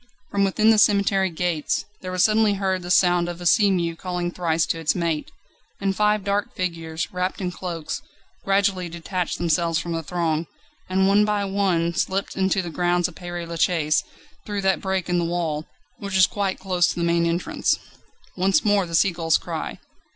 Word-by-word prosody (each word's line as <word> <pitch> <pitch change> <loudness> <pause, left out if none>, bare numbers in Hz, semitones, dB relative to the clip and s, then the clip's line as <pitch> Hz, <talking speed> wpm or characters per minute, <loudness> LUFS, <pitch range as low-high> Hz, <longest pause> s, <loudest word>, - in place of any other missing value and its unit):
From 200 0 +1
within 215 +3 +4
the 220 - +4
cemetery 200 -2 +3
gates, 170 -2 -1 0.2
there 185 - -5
was 185 0 +2
suddenly 215 -1 +3
heard 190 -1 -1
the 175 - -7
sound 175 -1 +3
of 175 0 -6
a 175 - -7
sea 200 +5 +5
mew 170 -3 0
calling 180 0 -3
thrice 165 -2 0
to 165 - -2
its 160 -2 +1
mate. 165 -4 -1 0.5
And 195 -1 0
five 210 0 +2
dark 200 +1 -1
figures, 165 -3 -3
wrapped 180 +1 -2
in 180 -2 -2
cloaks, 170 -4 -5 0.4
gradually 195 -2 +1
detached 170 +1 -3
themselves 165 0 +1
from 170 +1 -3
the 165 0 -1
throng, 165 -1 -1 0.4
and 190 +1 +2
one 200 +1 +5
by 210 -1 0
one 190 -4 +1
slipped 190 +3 -1
into 190 0 +1
the 170 - -6
grounds 175 +2 +1
of 180 - -11
Père 175 -1 -6
Lachaise 160 -2 +1 0.4
through 205 -1 -3
that 190 -1 +1
break 190 -2 -1
in 175 -1 +1
the - - 0
wall, 165 -3 -2 0.3
which 200 -1 -2
is 185 - +7
quite 200 -2 -2
close 180 -2 +1
to - - -2
the 170 - -2
main 170 0 +2
entrance. 170 +2 0 0.6
Once 190 +3 +2
more 205 -3 +3
the 165 - -3
sea 190 +3 +4
gull's 165 -2 +2
cry. - - -5
180 Hz, 190 wpm, -23 LUFS, 170-195 Hz, 0.6 s, is